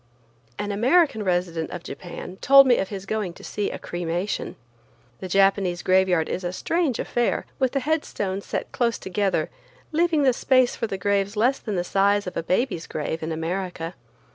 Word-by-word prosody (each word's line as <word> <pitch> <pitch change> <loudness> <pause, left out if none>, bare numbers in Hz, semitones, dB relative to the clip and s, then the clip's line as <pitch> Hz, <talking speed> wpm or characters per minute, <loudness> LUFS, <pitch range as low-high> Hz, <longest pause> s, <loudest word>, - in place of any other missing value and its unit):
An 205 0 -3
American 250 - +3
resident 175 -4 -1
of 175 -2 -7
Japan 180 +1 -8
told 275 +5 +7
me 250 -2 +4
of 190 - -2
his 195 -2 -6
going 205 -4 -2
to - - -14
see 205 - -2
a - - -5
cremation. 175 +3 -3 0.6
The 185 - -5
Japanese 195 -1 +2
graveyard 185 -3 +3
is 185 - -3
a 175 - -2
strange 315 - 0
affair, 240 -1 0
with 260 0 +1
headstones 250 -9 -1
set - - -3
close 235 -2 0
together, 195 +1 -1 0.4
leaving 320 -1 +2
the 260 -2 +4
space 255 0 +3
for 230 - -2
the 195 - -4
graves 200 +1 0
less 250 +5 +2
than 210 -3 -4
the 175 - 0
size 200 +2 +2
of 180 - -6
a - - -1
baby's 180 0 -1
grave 160 +1 -3
in 160 +1 -3
America. 170 +1 -3
195 Hz, 175 wpm, -24 LUFS, 180-240 Hz, 0.6 s, told